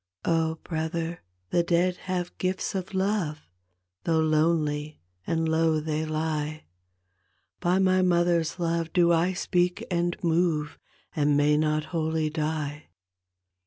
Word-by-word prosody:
" - - -16
Oh, 160 -1 +1
brother, 165 +1 -3 0.3
the 175 - +3
dead 175 +1 +1
have 180 -1 -2
gifts 185 0 -1
of 190 0 -4
love, 190 -6 0 0.6
Though 165 -1 +2
lonely 155 -1 +1 0.3
and 165 0 0
low 160 0 +2
they 155 0 -2
lie, 155 -1 -2 1.0
By 175 +2 +2
my 185 -1 +3
mother's 175 -2 +2
love 165 -1 -1
do 170 -1 +4
I 170 +3 +2
speak 180 -1 0
and 175 0 0
move 165 -3 +1 0.4
And 145 -2 +3
may 145 +1 +4
not 155 0 +1
wholly 160 -1 0
die." 155 -1 -3
165 Hz, 125 wpm, -27 LUFS, 155-175 Hz, 1.0 s, do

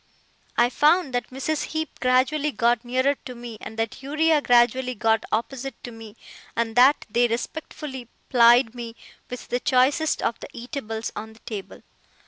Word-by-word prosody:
I 240 +1 +4
found 300 0 +3
that 245 - -2
Mrs. 275 +4 -2
Heep 315 -2 -5
gradually 265 +4 +2
got 235 0 +1
nearer 260 +3 +1
to 250 - -7
me, 235 -2 -9
and 220 - -9
that 225 +3 -3
Uriah 305 +2 +2
gradually 250 0 +3
got 225 +1 +1
opposite 245 +3 -3
to 245 - -7
me, 225 -2 -11 0.4
and 230 -1 -1
that 260 +4 +5
they 240 +3 +2
respectfully 260 +1 -5 0.2
plied 240 -1 +5
me 235 -2 -7 0.3
with 250 - -8
the 245 - 0
choicest 280 +5 +2
of 230 - -1
the - - -9
eatables 235 -3 -5
on 220 +1 -7
the 220 - -20
table. 205 -4 -8
245 Hz, 160 wpm, -24 LUFS, 230-270 Hz, 0.4 s, that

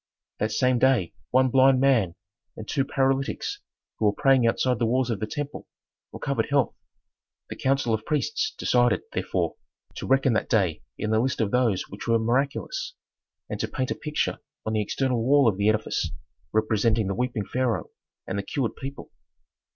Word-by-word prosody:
That 110 +1 0
same 125 +2 +2
day 130 -10 +3 0.2
one 130 0 +3
blind 130 0 +5
man 120 -11 +3 0.4
and 110 - -8
two 140 - +1
paralytics, 135 0 -1 0.4
who 110 - +1
were 105 - +5
praying 135 -3 +4
outside 125 +1 +1
the 115 - +2
walls 125 +1 +1
of 110 - -2
the 110 - -2
temple, 145 +4 -5 0.4
recovered - - -2
health. - - +2 0.8
The - - -4
council 135 -3 +1
of 110 0 -1
priests 150 +1 -1
decided, 120 -1 +2
therefore, - - -1 0.4
to - - -5
reckon 135 -1 +3
that 110 - 0
day 95 -9 +1 0.2
in 110 - -2
the 110 - +3
list 130 +3 0
of 110 -3 0
those 120 -7 +2
which 100 - -9
were 115 0 +4
miraculous, 135 - -1 0.5
and - - -5
to - - -1
paint 130 -2 -3
a - - 0
picture 150 -1 -2 0.3
on 110 - -1
the 110 - +2
external 125 +2 0
wall 140 +1 +5
of 100 -4 +2
the 100 +1 +3
edifice 110 0 0 0.4
representing 110 0 +2
the 100 - -1
weeping 120 -1 -2
pharaoh 125 -2 -1 0.3
and 100 +1 -3
the - - -3
cured 130 -1 -2
people. 140 +1 -8
120 Hz, 175 wpm, -26 LUFS, 110-135 Hz, 0.8 s, blind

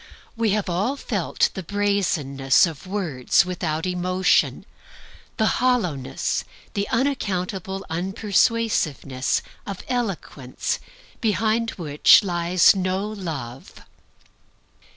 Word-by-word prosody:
We 230 -1 +1
have 210 -2 -1
all 195 +10 0
felt - - 0
the 190 - -5
brazenness 175 -9 +2
of 165 +1 -7
words 175 -7 +1
without 165 -2 -2
emotion, 185 +1 +1 0.7
the 220 - +2 0.2
hollowness, 180 - 0 0.3
the 200 0 -2
unaccountable 195 -7 -2
unpersuasiveness, 185 - 0 0.2
of 200 -2 -6
eloquence 195 - -3 0.4
behind 220 +1 +1
which 150 0 +5
lies 175 0 +4
no 190 +1 -1
Love. 155 - -7
185 Hz, 90 wpm, -23 LUFS, 160-210 Hz, 0.7 s, which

